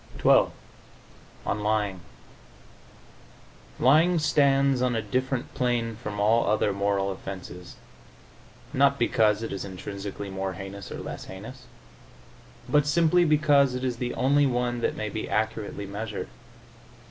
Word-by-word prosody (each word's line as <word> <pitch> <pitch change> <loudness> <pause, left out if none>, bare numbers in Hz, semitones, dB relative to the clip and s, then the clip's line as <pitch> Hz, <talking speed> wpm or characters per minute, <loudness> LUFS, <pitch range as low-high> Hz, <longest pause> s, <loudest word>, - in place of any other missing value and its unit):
XII - - +6 1.0
ON 105 - -1
LYING 105 -2 0 1.8
Lying 160 +7 +4
stands 140 -4 +3
on 125 -1 +1
a 115 - 0
different 130 +3 -2
plane 120 -2 0
from 105 -2 -6
all 110 +3 +3
other 105 -1 +2
moral 100 0 0
offenses, 90 -2 -8 1.0
not 140 +1 +3
because 110 -3 +2
it 115 - -4
is 95 - -4
intrinsically 100 +1 -6
more 95 0 -3
heinous 95 0 -8
or - - -5
less - - -7
heinous, 115 +7 -10 1.0
but 145 +3 +3
simply 170 +3 +4
because 145 -4 +4
it 125 - -4
is 125 -2 -1
the 125 0 -3
only 140 +2 +3
one 120 -1 -1
that - - 0
may 110 - -3
be 110 +1 -5
accurately 105 -1 -2
measured. 105 +3 -5
115 Hz, 130 wpm, -26 LUFS, 100-135 Hz, 1.8 s, XII